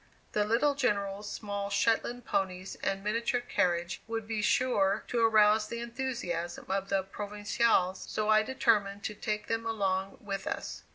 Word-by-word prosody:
The 210 -3 +1
little 235 +7 +3
General's 205 -6 -1
small 200 -1 -4
Shetland 235 +3 +1
ponies 190 -1 -2
and 195 0 -1
miniature 230 +3 0
carriage 175 -7 0
would 225 -1 -3
be 220 -1 -1
sure 210 -5 +2
to 235 -2 +1
arouse 215 -1 +5
the 235 - -5
enthusiasm 235 -8 -3
of 195 0 -1
the 195 -1 +1
"Provincials," 205 -1 0
so 215 0 -1
I 215 0 +6
determined 215 -4 +1
to 210 - -3
take 210 0 -3
them 225 0 -1
along 195 -4 -1
with 195 -2 -5
us. - - -4
210 Hz, 155 wpm, -30 LUFS, 195-230 Hz, -, I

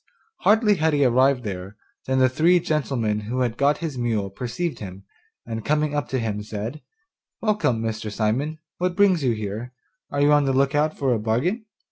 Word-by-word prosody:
Hardly 210 -1 +4
had 160 -1 +2
he 145 -1 +3
arrived 130 +1 +3
there, 95 0 -6 0.3
than 130 0 +1
the 130 0 +5
three 165 +7 +3
gentlemen 135 -10 -1
who 115 +5 -3
had 120 -2 0
got 140 +3 +2
his 140 -6 -4
mule 110 -5 -1
perceived 125 - -4
him, 95 -1 -8 0.4
and 115 -1 -5
coming 150 +2 +1
up 145 -4 -1
to 130 - -1
him 110 -4 -2
said: 110 +7 -6 0.6
'Welcome, 205 - +1
Mr. 110 -1 -3
Simon, 120 +9 -1 0.2
what 180 0 0
brings 190 -5 +4
you 125 -3 +2
here; 110 +3 -5 0.4
are 145 - -1
you 145 +1 +5
on 145 -1 +4
the 135 - +1
look 135 +1 +2
out 150 +1 +1
for 135 -3 +1
a 115 - 0
bargain? 150 - -1
130 Hz, 190 wpm, -23 LUFS, 110-150 Hz, 0.6 s, the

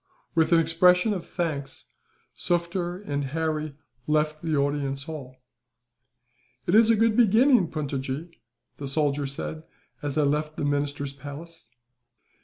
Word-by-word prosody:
With 165 +1 +2
an 170 - +6
expression 180 +5 +4
of 185 -4 -5
thanks, 145 -6 -4 0.5
Sufder 175 +1 -1
and 145 -3 -1
Harry 155 +1 -2 0.3
left 155 0 +1
the 160 -2 -1
audience 140 -1 0
hall. 140 -5 -8 1.3
"It 175 - 0
is 225 +1 +6
a 230 - +6
good 225 0 +3
beginning, 235 -1 +5
Puntojee," 145 +1 -4 0.5
the 140 - -5
soldier 145 0 0
said, 150 +3 -5 0.4
as 145 -2 -3
they 155 - +3
left 150 +2 0
the - - -1
minister's 145 -1 -1
palace. 145 +1 -9
155 Hz, 130 wpm, -26 LUFS, 140-170 Hz, 1.3 s, an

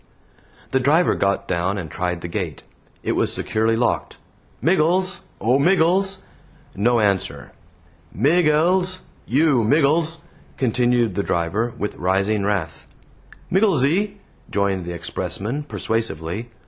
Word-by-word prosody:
The 130 - +2
driver 150 +7 +3
got 100 0 0
down 90 +3 -1
and 85 -5 -6
tried 90 -2 -2
the 85 - -5
gate. 85 -4 -4 0.4
It - - 0
was - - +1
securely 110 +1 0
locked. 120 +1 -1 0.4
"Miggles! 185 +3 +1 0.2
O 125 +5 +2
Miggles!" 190 +4 +3 0.6
No 120 +4 +2
answer. 100 -3 -1 0.6
"Migg 150 - +3
ells! 180 +4 +2 0.3
You 140 -2 +3
Miggles!" 155 +6 +2 0.4
continued 120 -2 +1
the 100 - 0
driver, 95 +6 -1
with 105 - -4
rising 100 +3 +1
wrath. 100 -6 -2 0.6
"Migglesy!" 190 - +2 0.4
joined 100 -3 0
the 90 - -5
expressman, 95 - -3
persuasively. 110 - -3
115 Hz, 115 wpm, -21 LUFS, 100-160 Hz, 0.6 s, driver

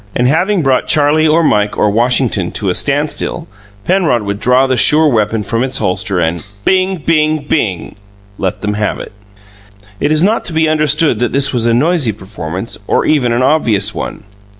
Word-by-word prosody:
And 125 - +1
having 180 +6 +1
brought 130 -2 +1
Charlie 155 +1 +3
or 160 +2 +3
Mike 105 -7 +1
or 105 - +2
Washington 115 -4 +1
to 100 -3 -1
a - - -1
standstill, 150 - -1 0.4
Penrod 170 - +1
would 100 0 -4
draw 125 +3 +3
the 130 -1 0
sure 155 +7 +4
weapon 110 -4 0
from 115 +3 -2
its 130 0 -2
holster 90 0 -1
and 85 0 -1 0.2
"Bing! 190 0 +1
Bing! 155 -2 +1
Bing!" 100 - -2 0.4
let 95 - -3
them 105 0 -2
have 105 0 -2
it. - - -9 0.9
It - - 0
is 155 +1 +2
not 215 +4 +1
to 170 - -6
be 160 0 +1
understood 150 -4 +1
that 120 -1 -1
this 135 0 +2
was 120 -2 0
a 115 - +2
noisy 145 -3 +1
performance, 95 0 -7
or - - +1
even 135 -6 +1
an 120 +2 0
obvious 110 -8 +1
one. - - -6
130 Hz, 185 wpm, -13 LUFS, 105-155 Hz, 0.9 s, sure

